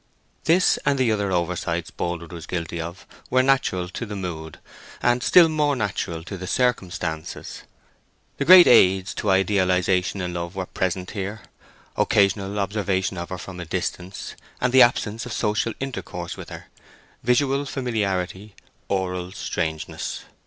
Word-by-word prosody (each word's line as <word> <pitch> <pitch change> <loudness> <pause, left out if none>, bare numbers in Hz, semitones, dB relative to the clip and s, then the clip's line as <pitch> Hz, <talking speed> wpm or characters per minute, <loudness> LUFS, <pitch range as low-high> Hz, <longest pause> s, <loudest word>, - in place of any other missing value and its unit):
This, 175 +3 +4
and 140 - +2
the 130 -4 +2
other 100 -2 0
oversights 85 -1 -1
Boldwood 85 -1 -4
was 85 -2 -8
guilty 85 -1 -3
of, 85 +3 -8 0.2
were 130 0 +4
natural 130 -10 +1
to 95 - -5
the 105 -2 -5
mood, 80 -5 -6 0.4
and 120 0 +2
still 170 +5 +7
more 150 -2 +1
natural 95 -7 -3
to 95 +1 -7
the 95 - -6
circumstances. 90 -10 -2 0.8
The 140 - -1
great 180 +2 +10
aids 95 -4 +5
to 105 - -2
idealization 95 -1 +2
in 90 -1 -3
love 85 +1 -5
were 95 -1 -3
present 90 0 -2
here: 105 +2 -5 0.5
occasional 100 0 +2
observation 100 -2 -1
of 85 - -6
her 90 - -4
from 90 -1 -9
a 85 - -5
distance, 90 +2 -4 0.3
and 125 0 0
the 130 - +8
absence 115 -1 +2
of 120 - -5
social 110 +2 0
intercourse 90 -10 -5
with - - -9
her—visual 135 +3 -2
familiarity, 105 -6 -2 0.3
oral 90 -2 -2
strangeness. 80 -4 -4
95 Hz, 145 wpm, -23 LUFS, 90-115 Hz, 0.8 s, great